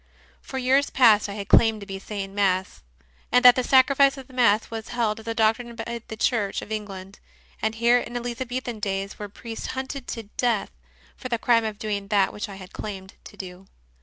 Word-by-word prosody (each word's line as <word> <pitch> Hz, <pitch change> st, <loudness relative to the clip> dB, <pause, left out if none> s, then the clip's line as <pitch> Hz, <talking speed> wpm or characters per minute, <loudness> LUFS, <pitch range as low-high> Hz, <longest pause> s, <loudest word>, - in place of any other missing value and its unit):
For 265 Hz, -, -7 dB
years 265 Hz, +2 st, +2 dB
past 220 Hz, -5 st, +5 dB
I -, -, -5 dB
had 200 Hz, -2 st, -6 dB
claimed 225 Hz, -1 st, +5 dB
to -, -, -7 dB
be 195 Hz, -1 st, -6 dB
saying 195 Hz, -1 st, -6 dB
Mass, 190 Hz, -, 0 dB, 0.5 s
and 250 Hz, +1 st, +4 dB
that 245 Hz, -1 st, +10 dB
the 255 Hz, -, 0 dB
Sacrifice 275 Hz, +2 st, +5 dB
of 265 Hz, -, -9 dB
the 260 Hz, -, -18 dB
Mass 230 Hz, -4 st, +3 dB
was 225 Hz, -1 st, -5 dB
held 230 Hz, -3 st, -1 dB
as 220 Hz, -, -13 dB
a 230 Hz, -, -2 dB
doctrine 230 Hz, +2 st, +1 dB
by 235 Hz, +1 st, -5 dB
the 220 Hz, -, -7 dB
Church 215 Hz, -3 st, 0 dB
of 215 Hz, -, -11 dB
England; 195 Hz, -2 st, -6 dB, 0.4 s
and 220 Hz, 0 st, 0 dB
here 235 Hz, +2 st, +4 dB
in 240 Hz, 0 st, -5 dB
Elizabethan 245 Hz, -1 st, -4 dB
days 195 Hz, -1 st, -3 dB
were 205 Hz, -1 st, -6 dB
priests 225 Hz, +2 st, -7 dB
hunted 265 Hz, 0 st, -5 dB
to 230 Hz, -, -5 dB
death 235 Hz, -5 st, 0 dB, 0.4 s
for 255 Hz, -, -7 dB
the 235 Hz, -, 0 dB
crime 230 Hz, -1 st, +3 dB
of 215 Hz, -1 st, -4 dB
doing 205 Hz, -2 st, -3 dB
that 200 Hz, -2 st, +2 dB
which 210 Hz, +1 st, -5 dB
I 200 Hz, -, -8 dB
had 190 Hz, -1 st, -12 dB
claimed 190 Hz, -2 st, -7 dB
to -, -, -13 dB
do. 185 Hz, 0 st, -9 dB
225 Hz, 210 wpm, -25 LUFS, 200-245 Hz, 0.5 s, that